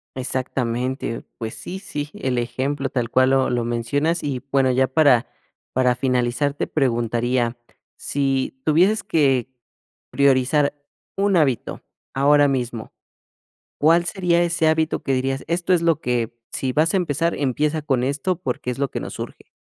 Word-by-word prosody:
Exactamente. 130 -1 -2 0.2
Pues 110 -1 -5
sí, 190 +2 -7
sí, 150 -6 -5
el 130 -2 -2
ejemplo 135 +3 -2
tal 120 -3 -2
cual 130 +1 +3
lo 135 -1 +3
lo 120 -1 -1
mencionas 140 +8 0
y 135 -3 -3
bueno, 135 -2 +3
ya 130 +1 +2
para 130 -3 +4 0.5
para 125 -1 +2
finalizar 125 +2 0
te 145 - -3
preguntaría. 120 -2 0 0.4
Si 135 -2 -1
tuvieses 180 +9 +3
que 140 - +2 0.6
priorizar 140 +1 +3 0.4
un 200 0 +2
hábito 135 -8 0 0.3
ahora 145 +1 +4
mismo, 120 -4 -3 0.9
¿cuál 165 +3 +4
sería 175 -3 +1
ese 170 -2 +1
hábito 160 0 +1
que 135 - +1
dirías: 135 +1 -1
"Esto 170 +2 0
es 175 -2 +3
lo 165 -2 +2
que, 120 -3 -1 0.2
si 130 -1 -2
vas 155 +5 +2
a - - +4
empezar, 170 -2 0
empieza 150 +3 0
con 135 -4 0
esto, 145 +7 -1
porque 125 -3 -3
es 125 - -8
lo 140 -2 0
que - - -3
nos - - -7
urge"? - - -8
135 Hz, 155 wpm, -22 LUFS, 125-155 Hz, 0.9 s, para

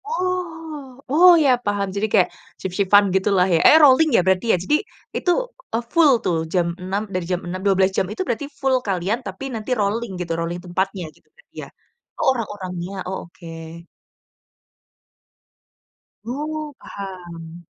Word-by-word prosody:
Oh, 325 - -4
oh 355 +5 +8
ya 280 - +4 0.2
paham. 205 -1 0
Jadi 205 +2 0
kayak 190 -4 +4 0.3
shift-shift-an 200 +2 +3
gitulah 190 -1 +3
ya. 165 - +4
Eh 315 - +8
rolling 295 +3 +6
ya - - +5
berarti 190 +2 +2
ya. - - +3
Jadi 295 - +2 0.4
itu, 355 - +1 0.4
eee, 230 +1 0
full 330 -4 +6
tuh 175 - +1 0.2
jam 175 -2 +2
enam 190 +3 -2
dari 180 -1 -2
jam 180 - +1
6.00, 180 +1 -4
12 195 -1 +3
jam - - +2
itu 215 - -4
berarti 240 +5 -2 0.2
full 270 -1 +3
kalian 195 +4 0
tapi - - -7
nanti 225 +2 -5
rolling 215 +2 -1
gitu, 170 -2 -3
rolling 170 +1 -3
tempatnya 190 +1 -2
gitu - - -28
berarti 485 - -26
ya? - - -9 0.5
Oh - - 0
orang-orangnya, 190 -6 -5 0.2
oh 190 - -3
oke. 170 +1 -17 2.8
Oh, 300 +4 -4
paham. 175 -3 -9
200 Hz, 150 wpm, -21 LUFS, 185-270 Hz, 2.8 s, oh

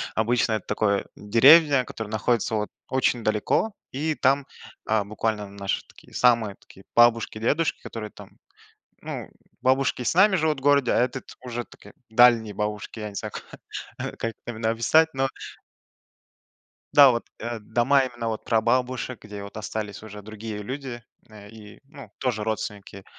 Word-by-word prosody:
обычно 115 0 +1
это 110 - -2
такое, 105 -1 +1
деревня, 135 +6 +6
которая 110 -1 -7
находится, 110 +1 0
вот, 105 -1 -1 0.2
очень 125 -3 +1
далеко, 110 - +1 0.2
и 155 +4 -1
там, 140 +1 +2 0.4
а, 110 -1 +1
буквально 105 0 -2
наши 100 -1 -3
такие, - - -19
самые 115 -5 +3
такие 95 - -18
бабушки-дедушки, 120 +5 +3
которые 110 -2 -7
там, - - -13 0.7
ну - - -6 0.3
бабушки 130 0 +2
с 120 - 0
нами 190 +2 +6
живут 155 -3 0
в - - -16
городе, 140 -3 +4
а - - +3
этот, 125 +1 -1 0.2
уже 120 -1 -4
такие - - -16 0.2
дальние 115 -2 +5
бабушки, 105 +1 -4
я 105 - -4
не 100 - -12
знаю - - -4
ка - - -8
как 115 - -3
именно 110 -1 -2
описать. 155 +8 +4
Но 135 0 +1 1.7
да 140 -3 +9
вот, 120 - -2
э, 120 0 -4
дома 125 +6 +2
именно, 120 -2 -5
вот, 110 - -4
прабабушек, 125 +2 0
где, 105 -1 -8
вот, 100 +1 -9
остались 105 -1 -5
уже 105 -1 -10
другие 110 0 -7
люди, 130 0 -6 0.3
э, 105 -1 -13
и, 105 -1 -13
ну, 140 -7 -13
тоже 120 -5 -1
родственники, 105 -2 -5
115 Hz, 155 wpm, -25 LUFS, 105-130 Hz, 1.7 s, да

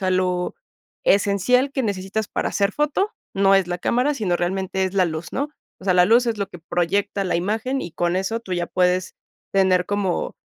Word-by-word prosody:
sea, 185 -1 0
lo 180 -1 0 0.5
esencial 205 +7 +3
que 265 - -1
necesitas 200 +1 -2
para - - -1
hacer 200 0 +1
foto 300 - 0 0.2
no 195 0 +4
es 195 -2 +3
la 175 0 -2
cámara, 250 +9 +1
sino 185 -8 0
realmente 190 +1 -1
es 185 - -2
la 190 -2 +4
luz, 160 +1 -5
¿no? 285 +2 -2 0.3
O - - -12
sea, 185 - +3
la 180 0 +6
luz 235 +5 +4
es 230 -2 0
lo 200 -1 -3
que 175 - -11
proyecta 180 +4 -1
la 180 - 0
imagen 225 +9 -1
y 170 - -6
con 175 +1 0
eso 210 +5 -1
tú 190 -5 -7
ya 175 -1 -1
puedes 180 +1 +1 0.4
tener 185 -2 +3
como, 205 -3 -1
195 Hz, 205 wpm, -22 LUFS, 180-220 Hz, 0.5 s, la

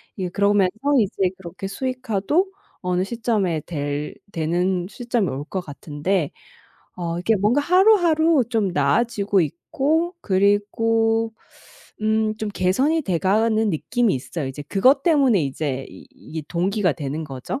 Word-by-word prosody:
이게 185 -2 -3
그러면서 200 0 +2 0.3
이제 195 -3 +1
그렇게 185 +1 -8
수익화도 255 - -1 0.3
어느 180 0 0
시점에 210 -7 -1
될 145 -2 -4 0.2
되는 175 +2 0
시점이 235 -1 -1
올 135 +2 -4
것 190 +4 -4
같은데. 150 +2 -2 0.7
어 170 -1 -3
이게 200 +6 +2
뭔가 210 +8 +2
하루하루 335 - +4
좀 220 -5 +1
나아지고 200 - +1
있고 300 - -1
그리고 225 +3 +1 0.7
음 215 0 +1
좀 215 - -3
개선이 255 - +1
돼가는 215 - +1
느낌이 225 +7 0
있어요. 140 +3 -4
이제 135 +2 -6
그것 255 - +3
때문에 275 - +3
이제 135 -1 -3
이 - - -13
이게 160 0 -8
동기가 185 +1 +1
되는 145 +3 -4
거죠. 135 - -5
200 Hz, 285 characters per minute, -22 LUFS, 170-230 Hz, 0.7 s, 하루하루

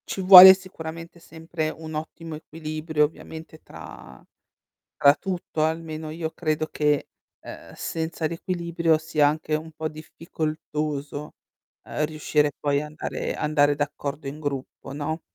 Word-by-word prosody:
Ci 195 - -4
vuole 190 0 +12
sicuramente 165 -3 -9
sempre 160 -1 -5
un 160 0 -9
ottimo 160 +1 -6
equilibrio 155 0 -2
ovviamente 160 +1 -10
tra 70 -4 -12 0.7
tra 140 0 +6
tutto 175 -4 -3
almeno, 160 -1 -3
io 160 0 -4
credo 155 -2 -2
che 150 -2 0 0.3
ehm, - - -11
senza 160 0 -3
l'equilibrio 170 -1 -1
sia 155 -2 +2
anche 155 0 -2
un 160 +1 -6
po' 155 0 -4
difficoltoso, 155 -2 -5 0.5
ehm, 150 - -2
riuscire 150 -1 0
poi 145 -1 0
andare 150 +1 -5
andare 145 -1 +2
d'accordo 145 0 -4
in 145 +3 -7
gruppo, 135 -2 -5
no? 150 +3 -4
155 Hz, 125 wpm, -24 LUFS, 150-165 Hz, 0.7 s, vuole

